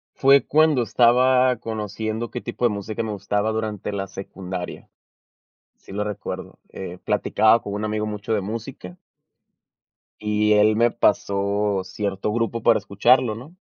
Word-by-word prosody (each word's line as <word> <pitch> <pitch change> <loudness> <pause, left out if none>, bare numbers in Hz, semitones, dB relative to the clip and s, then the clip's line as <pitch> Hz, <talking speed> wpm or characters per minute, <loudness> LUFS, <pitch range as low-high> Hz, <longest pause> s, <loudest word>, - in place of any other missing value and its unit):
Fue 135 +1 +5
cuando 155 -3 +3
estaba 125 +3 +4
conociendo 110 +1 -4
qué 125 - -5
tipo 125 - -5
de - - +6
música 105 +1 -4
me 110 -2 -4
gustaba 105 +2 -1
durante 110 -2 -3
la 100 -1 -3
secundaria. 95 -2 -7 0.9
Sí - - -18
lo 105 +1 -2
recuerdo, 105 -2 -6
eh, 90 -1 -8
platicaba 110 +1 +3
con 100 - -6
un 105 +1 -3
amigo 105 0 -2
mucho 105 +1 -4
de 105 - +1
música. 110 -3 -7 1.2
Y 105 0 +1
él 105 +1 +4
me 120 +1 +4
pasó 100 -2 0
cierto 100 +1 -3
grupo 115 0 -1
para - - +5
escucharlo, 110 +4 +2
¿no? 140 +11 -12
105 Hz, 145 wpm, -23 LUFS, 100-115 Hz, 1.2 s, de